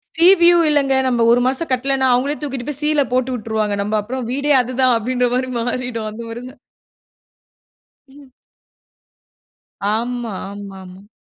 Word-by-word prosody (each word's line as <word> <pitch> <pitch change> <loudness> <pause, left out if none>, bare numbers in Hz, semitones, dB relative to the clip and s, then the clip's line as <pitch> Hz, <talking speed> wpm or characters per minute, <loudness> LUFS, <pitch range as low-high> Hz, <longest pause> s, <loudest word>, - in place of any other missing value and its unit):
C 335 +2 +4
view 345 0 +6
இல்லங்க, 285 -2 +2
நம்ம 240 -2 +1
1 245 +1 +4
மாசம் 270 +6 -1
கட்லேனா 265 +1 +1
அவுங்களே 270 +4 0
தூக்கிட்டு 270 -4 -5
போயி 290 -2 -2
சீல 300 -1 +2
போட்டு 255 0 0
விட்டுருவாங்க. 215 -2 -2 0.3
அப்புறம் 255 +5 -5
வீடே 285 +3 +1
அதுதான் 255 +1 +1
அப்டின்ற 245 +2 0
மாரி 255 0 -1
மாறிடும். 245 -1 -3
அந்த 220 +2 -8
மாரி 235 +2 -7
தான். 280 - -23 1.5
ம் 275 0 -16 1.6
ஆமா. 235 -1 -3 0.2
ஆமா. 200 -1 -9
ஆமா. 185 +2 -14
250 Hz, 140 wpm, -19 LUFS, 230-275 Hz, 1.6 s, view